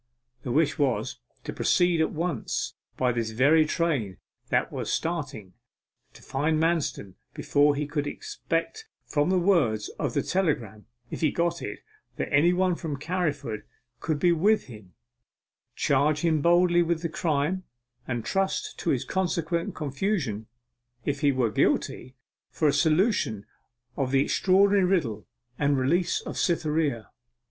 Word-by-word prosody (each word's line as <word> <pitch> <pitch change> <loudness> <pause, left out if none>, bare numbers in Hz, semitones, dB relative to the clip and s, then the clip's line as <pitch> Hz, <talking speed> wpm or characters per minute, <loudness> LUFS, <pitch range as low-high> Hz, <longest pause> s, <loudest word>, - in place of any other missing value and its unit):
The 125 - -4
wish 150 +3 +1
was 135 -4 0 0.2
to - - -5
proceed 175 -2 +2
at 160 - +1
once 165 -6 -2 0.2
by 125 -1 +2
this 115 -2 -2
very 145 +8 +4
train 140 - -1 0.3
that - - +1
was - - -4
starting, 145 - -3 0.6
find 150 +3 -1
Manston 160 - -1 0.2
before 145 0 +3
he 150 +1 -2
would 145 -2 -1
expect 435 - -4 0.2
from 145 +2 0
the 185 - +3
words 165 - +2
of - - -2
the - - +1
telegram 145 - -1 0.2
(if - - -5
he 155 - +3
got 170 0 -1
it) - - -6 0.3
that - - -4
anybody 180 +5 +3
from 150 -4 -4
Carriford 145 - -2 0.4
could 155 +2 -1
be 175 +4 +3
with 200 +6 +3
him 105 -7 -13 0.8
charge 145 +2 +2
him 160 -3 +2
boldly 175 +1 +4
with 170 0 0
the - - +1
crime, 160 +3 -1 0.4
and 120 -3 -3
trust 195 0 -1
to 175 - -2
his 135 -6 0
consequent 170 -2 -1
confusion 140 - -2 0.6
(if 145 -1 -1
he 145 -1 +3
were 125 -4 0
guilty) 130 +4 0 0.3
for 155 - 0
a 145 - +3
solution 160 - +1 0.5
of 135 -2 -1
the 135 +1 +3
extraordinary 195 +4 +3
riddle, 150 - 0 0.3
and 145 -1 +2
the - - 0
release 170 +7 +1
of - - -6
Cytherea! 155 - 0
155 Hz, 145 wpm, -26 LUFS, 135-175 Hz, 0.8 s, very